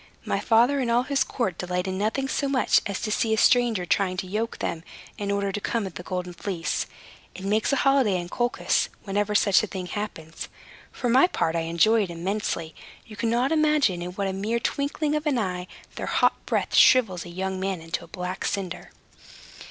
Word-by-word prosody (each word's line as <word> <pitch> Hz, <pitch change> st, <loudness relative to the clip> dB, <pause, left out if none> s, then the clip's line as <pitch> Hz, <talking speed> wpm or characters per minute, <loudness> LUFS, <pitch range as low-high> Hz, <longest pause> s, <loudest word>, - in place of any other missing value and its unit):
My -, -, 0 dB
father 245 Hz, +5 st, +3 dB
and 250 Hz, -3 st, 0 dB
all 240 Hz, +1 st, +3 dB
his 280 Hz, +1 st, +1 dB
court 235 Hz, -8 st, -3 dB
delight 180 Hz, +1 st, -2 dB
in 190 Hz, 0 st, -2 dB
nothing 225 Hz, +6 st, 0 dB
so 280 Hz, +1 st, -1 dB
much 270 Hz, -2 st, +3 dB
as 200 Hz, -2 st, -3 dB
to 215 Hz, -, -2 dB
see 220 Hz, +1 st, +1 dB
a -, -, -6 dB
stranger 235 Hz, -5 st, +3 dB
trying 185 Hz, 0 st, +1 dB
to 185 Hz, -, -2 dB
yoke 215 Hz, +5 st, -3 dB
them, 165 Hz, -1 st, -3 dB, 0.4 s
in 200 Hz, -1 st, -3 dB
order 200 Hz, 0 st, 0 dB
to 205 Hz, -, -4 dB
come 230 Hz, -1 st, -1 dB
at 190 Hz, -, -6 dB
the -, -, -7 dB
Golden 180 Hz, 0 st, -4 dB
Fleece. 175 Hz, -1 st, -2 dB, 0.5 s
It 190 Hz, -, -7 dB
makes 215 Hz, +5 st, +1 dB
a -, -, +3 dB
holiday 265 Hz, -8 st, +3 dB
in 175 Hz, -, -5 dB
Colchis 240 Hz, +6 st, 0 dB
whenever 205 Hz, +1 st, -1 dB
such 200 Hz, -3 st, +5 dB
a 215 Hz, -, -3 dB
thing 185 Hz, -2 st, -5 dB
happens. 175 Hz, -5 st, -6 dB, 0.4 s
For 245 Hz, -, -3 dB
my 255 Hz, +8 st, +5 dB
part, 165 Hz, -, -1 dB
I 165 Hz, 0 st, -1 dB
enjoy 215 Hz, +7 st, +4 dB
it 195 Hz, -, -2 dB
immensely. 170 Hz, -2 st, -3 dB, 0.3 s
You 215 Hz, -, -11 dB
cannot 235 Hz, +5 st, +1 dB
imagine 300 Hz, -, +3 dB
in 180 Hz, +1 st, -5 dB
what 200 Hz, +1 st, -2 dB
a 190 Hz, -, -2 dB
mere 215 Hz, +5 st, -1 dB
twinkling 290 Hz, +4 st, -1 dB
of 300 Hz, +1 st, -2 dB
an 280 Hz, -4 st, +2 dB
eye 180 Hz, -4 st, -2 dB, 0.3 s
their -, -, -4 dB
hot -, -, +1 dB
breath -, -, -1 dB
shrivels 200 Hz, -9 st, +5 dB
a 175 Hz, -, -10 dB
young 190 Hz, +2 st, -3 dB
man 190 Hz, -1 st, -2 dB
into 165 Hz, +1 st, -4 dB
a -, -, -12 dB
black 180 Hz, +1 st, -5 dB
cinder." 185 Hz, -3 st, -3 dB
200 Hz, 205 wpm, -25 LUFS, 180-235 Hz, 0.5 s, such